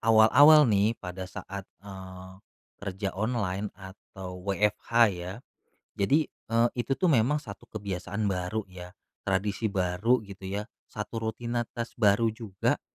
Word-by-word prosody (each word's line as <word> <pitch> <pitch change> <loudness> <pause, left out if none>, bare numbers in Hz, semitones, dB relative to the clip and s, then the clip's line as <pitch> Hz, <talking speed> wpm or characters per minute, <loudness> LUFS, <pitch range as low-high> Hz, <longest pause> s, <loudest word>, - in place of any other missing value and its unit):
awal-awal 145 +8 +7
nih 105 0 +3
pada 90 0 -7
saat, 100 0 -7 0.2
eee, 95 -1 -9 0.5
kerja 95 0 -3
online 105 -2 -1
atau 95 -1 -10
WFH 100 +2 -1 0.2
ya. 90 0 -6 0.6
Jadi, 140 +11 +2
eee, 115 -3 0
itu 130 +2 -1
tuh 185 -3 +3
memang 130 +3 +3
1 115 -10 -8
kebiasaan 100 0 -4
baru 90 +4 -2
ya, 90 0 -10 0.3
tradisi 100 +3 0
baru 100 +5 +1
gitu 100 -1 -9
ya, 100 +2 -3 0.2
1 105 +2 -5
rutinitas 120 +1 -3
baru 110 +2 +4
juga 110 -4 -1
100 Hz, 125 wpm, -28 LUFS, 95-115 Hz, 0.6 s, awal-awal